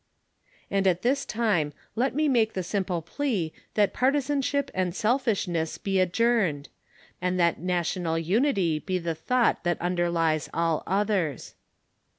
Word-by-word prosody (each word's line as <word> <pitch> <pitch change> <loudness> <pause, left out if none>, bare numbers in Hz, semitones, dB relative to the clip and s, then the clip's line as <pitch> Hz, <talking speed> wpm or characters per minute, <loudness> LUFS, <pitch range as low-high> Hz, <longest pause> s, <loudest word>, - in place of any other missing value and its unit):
And 195 -1 +2
at 180 -1 +1
this 275 +3 +1
time 205 -10 0 0.2
let 255 +3 0
me 305 +1 +2
make 230 -5 +2
the 185 - -2
simple 180 -2 -2
plea 195 - -2 0.2
that 205 -2 +3
partisanship 280 +1 +1
and 185 -1 -1
selfishness 210 -9 0
be 195 -1 -1
adjourned; 185 -6 +1 0.5
and 180 0 0
that 170 -1 +2
national 175 -1 -1
unity 185 - +1
be 185 +3 -2
the 170 -2 -2
thought 240 +10 +1
that 175 0 0
underlies 170 -3 0
all 165 -1 +1
others. 195 - -1
185 Hz, 135 wpm, -26 LUFS, 170-235 Hz, 0.5 s, that